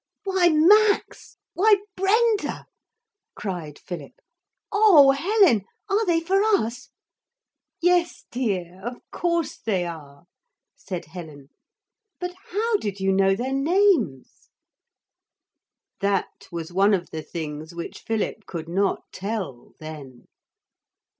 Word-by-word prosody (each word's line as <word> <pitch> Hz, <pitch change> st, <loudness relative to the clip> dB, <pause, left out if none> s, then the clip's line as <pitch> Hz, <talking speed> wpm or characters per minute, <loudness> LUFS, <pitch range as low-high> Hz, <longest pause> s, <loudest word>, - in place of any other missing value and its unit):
'Why 380 Hz, -3 st, +3 dB
Max! 405 Hz, +7 st, +3 dB, 0.2 s
why 420 Hz, +3 st, +5 dB, 0.2 s
Brenda!' 425 Hz, +3 st, +1 dB, 0.7 s
cried 175 Hz, -7 st, -5 dB
Philip. 175 Hz, -2 st, -8 dB, 0.6 s
'Oh, 385 Hz, -10 st, +7 dB
Helen! 335 Hz, -, +3 dB, 0.3 s
are 415 Hz, +3 st, +3 dB
they 335 Hz, -2 st, +3 dB
for 380 Hz, +4 st, +1 dB
us?' 275 Hz, -, 0 dB, 0.9 s
'Yes, 350 Hz, 0 st, +2 dB
dear, 190 Hz, -7 st, -3 dB
of 240 Hz, +2 st, -4 dB, 0.2 s
course 340 Hz, -2 st, -1 dB
they 190 Hz, -5 st, -1 dB
are,' 150 Hz, -3 st, -9 dB, 0.5 s
said 180 Hz, -3 st, -6 dB
Helen; 155 Hz, -4 st, -10 dB, 0.7 s
'but 360 Hz, 0 st, -4 dB, 0.2 s
how 435 Hz, +3 st, +1 dB
did 205 Hz, -, -5 dB
you 190 Hz, 0 st, +1 dB
know 195 Hz, 0 st, +3 dB
their 255 Hz, +6 st, -3 dB
names?' 290 Hz, -, +1 dB, 1.5 s
That 200 Hz, -1 st, -1 dB
was 170 Hz, 0 st, -6 dB
one 200 Hz, +2 st, +4 dB
of 180 Hz, -2 st, -6 dB
the 160 Hz, -, -4 dB
things 155 Hz, +1 st, -7 dB
which 170 Hz, -, -6 dB
Philip 220 Hz, -1 st, -3 dB
could 165 Hz, -2 st, -6 dB
not 195 Hz, +3 st, 0 dB
tell, 190 Hz, -, -5 dB
then. 150 Hz, -5 st, -10 dB
220 Hz, 110 wpm, -24 LUFS, -, 1.5 s, Oh